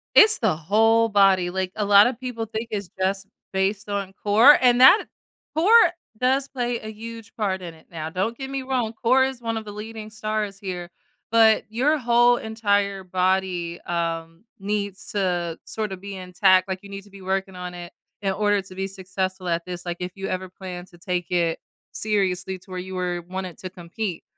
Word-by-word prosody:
It's 440 0 +8
the 215 -8 +1
whole 225 +7 +3
body, 195 -4 +4
like, 185 0 -2
a 215 - 0
lotta 205 +5 +6
people 240 -2 -5
think 225 +1 -5
it's 200 -4 -4
just 195 +1 0 0.3
based 195 +2 -1
on 200 -2 -3
core, 225 +8 +7
and 245 -1 +4
that 265 +12 +8 0.5
core 340 +6 +3 0.5
does 265 +3 +1
play 245 -3 -2
a 215 - -7
huge 225 0 -9
part 190 -4 -1
in 170 -2 -7
it 160 - -20
now. 160 -1 -5
Don't 195 +7 -2
get 270 +1 -6
me 270 -1 -3
wrong, 255 -4 -1
core 250 +3 +3
is 265 -2 -4
one 230 -1 -2
of 220 - -4
the 210 - -8
leading 215 +1 -8
stars 215 -2 -3
here, 180 -3 -6 0.4
but 225 -1 +5
your 260 +8 +2
whole, 240 -1 +4
entire 205 -3 0
body, 185 -2 0
um, 165 +1 -3
needs 200 -1 -3
to 175 -4 -1
sorta 210 -3 -4
be 195 +1 -8
intact, 185 +1 +3
like, 190 -1 -3
you 200 - -12
need 195 0 -7
to 205 - -19
be 195 -1 -13
working 190 0 -2
on 180 0 -6
it 175 0 -9 0.3
in 195 -2 0
order 205 +1 +2
to 185 0 -13
be 190 +1 -3
successful 190 -1 -4
at 170 0 0
this, 180 -1 -7
like, 175 0 -3
if 180 0 -3
you 195 0 -4
ever 185 0 -3
plan 180 -1 -8
to 175 -2 -18
take 180 -1 -3
it 170 -2 +1 0.3
seriously 190 -3 -1
to 185 - -20
where 185 -1 -4
you 185 +1 -7
were 180 -1 -2
wanted 185 0 -6
to 185 - -7
compete, 180 +1 -5
195 Hz, 195 wpm, -24 LUFS, 180-220 Hz, 0.5 s, It's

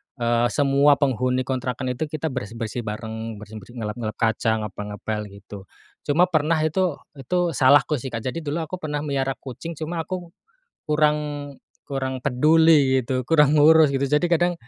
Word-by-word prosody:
eee, 120 -1 +1
semua 140 +2 +3
penghuni 130 -2 0
kontrakan 125 0 -3
itu 145 +5 -3
kita 155 0 -4
bersih-bersih 115 0 -5
bareng 110 +1 -5
bersih-bersih 105 +3 -11
ngelap-ngelap 110 -1 -4
kaca 110 -1 0
ngepel-ngepel 105 +1 -5
gitu, 100 -1 -12 0.4
cuma 155 +5 +4
pernah 155 +1 +2
itu 165 0 0 0.2
itu 175 +6 0
salahku 145 +2 +4
sih 130 - -6
Kak, 115 -3 -5
jadi 130 +6 -3
dulu 155 +1 -3
aku 175 +3 -6
pernah 150 -2 -3
melihara 135 -2 -1
kucing 140 +6 -8
cuma 165 +2 -4
aku, 180 -2 -5 0.5
kurang 150 0 +2 0.7
kurang 130 -2 -3
peduli 145 -1 +4
gitu, 130 +1 -2
kurang 150 -3 +4
ngurus 155 0 +6
gitu 140 0 0
jadi 150 +4 +1
kadang, 175 +1 +3
135 Hz, 150 wpm, -23 LUFS, 115-155 Hz, 0.7 s, ngurus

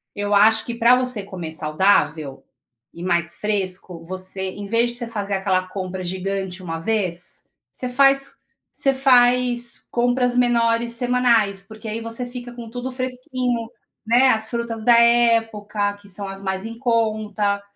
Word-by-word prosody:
Eu 205 0 -2
acho 220 +2 +5
que 235 - -5
pra 235 +2 +5
você 250 -4 0
comer 185 -5 -7
saudável 155 -2 0 0.5
e 170 - -11
mais 170 -2 0
fresco, 185 -4 -3
você 185 +1 -3
em 205 +1 -8
vez 230 +3 +1
de 240 - +2
você 240 -1 -4
fazer 205 -3 -4
aquela 190 -1 0
compra 185 0 -5
gigante 190 0 -4
uma 165 -2 -5
vez, 180 -2 -1 0.3
você 250 - -4
faz 275 +1 +4 0.4
você 275 -1 +1
faz 245 -2 +3
compras 245 +1 +1
menores 235 -1 +2
semanais, 235 -5 +2
porque 220 +3 -12
aí 220 +2 -4
você 230 +2 -5
fica 245 0 -8
com 235 -2 -9
tudo 250 +2 -5
fresquinho, 250 -2 -3 0.4
né. 245 +4 +4
As 220 -1 +1
frutas 235 -2 -3
da 235 0 +6
época, 225 -3 +2
que 205 0 -18
são 200 +1 -4
as 195 0 -7
mais 190 0 -2
em 230 0 -7
conta. 215 -4 0
220 Hz, 155 wpm, -21 LUFS, 195-245 Hz, 0.5 s, da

